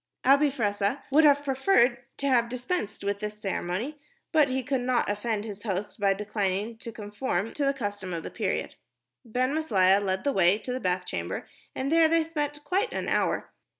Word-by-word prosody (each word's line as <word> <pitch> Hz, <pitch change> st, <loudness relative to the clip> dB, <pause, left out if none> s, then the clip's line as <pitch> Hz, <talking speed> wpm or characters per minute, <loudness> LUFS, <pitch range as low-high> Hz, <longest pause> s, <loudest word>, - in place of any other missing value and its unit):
Abi 280 Hz, +2 st, +6 dB
Fressah 210 Hz, -2 st, -1 dB
would 305 Hz, +3 st, +6 dB
have 285 Hz, -1 st, +5 dB
preferred 265 Hz, -2 st, +3 dB, 0.2 s
to 280 Hz, -, -1 dB
have 240 Hz, -3 st, +3 dB
dispensed 250 Hz, -, -3 dB
with 200 Hz, 0 st, -1 dB
this 210 Hz, 0 st, -5 dB
ceremony, 205 Hz, +8 st, -3 dB, 0.3 s
but 310 Hz, -4 st, +5 dB
he 260 Hz, 0 st, -1 dB
could 270 Hz, -2 st, -1 dB
not 250 Hz, -1 st, +1 dB
offend 210 Hz, +1 st, -2 dB
his 205 Hz, -2 st, -7 dB
host 205 Hz, 0 st, -3 dB
by 200 Hz, -1 st, +3 dB
declining 205 Hz, +1 st, -1 dB
to 230 Hz, -, -7 dB
conform 210 Hz, -1 st, -3 dB
to 290 Hz, -, -1 dB
the 275 Hz, -, +2 dB
custom 205 Hz, -6 st, -4 dB
of 165 Hz, -2 st, -3 dB
the -, -, -6 dB
period. -, -, -2 dB, 0.5 s
Ben 250 Hz, +4 st, 0 dB
Maslia 200 Hz, -11 st, +3 dB
led 190 Hz, -1 st, -1 dB
the 280 Hz, -, +1 dB
way 190 Hz, -1 st, +4 dB
to 250 Hz, +4 st, -5 dB
the 255 Hz, -, -2 dB
bath 180 Hz, -3 st, -1 dB
chamber, -, -, -4 dB, 0.3 s
and 270 Hz, +2 st, -2 dB
there 330 Hz, 0 st, +6 dB
they 330 Hz, 0 st, +3 dB
spent 295 Hz, -2 st, -3 dB
quite 385 Hz, +9 st, 0 dB
an -, -, -3 dB
hour. -, -, 0 dB
235 Hz, 190 wpm, -27 LUFS, 205-280 Hz, 0.5 s, Abi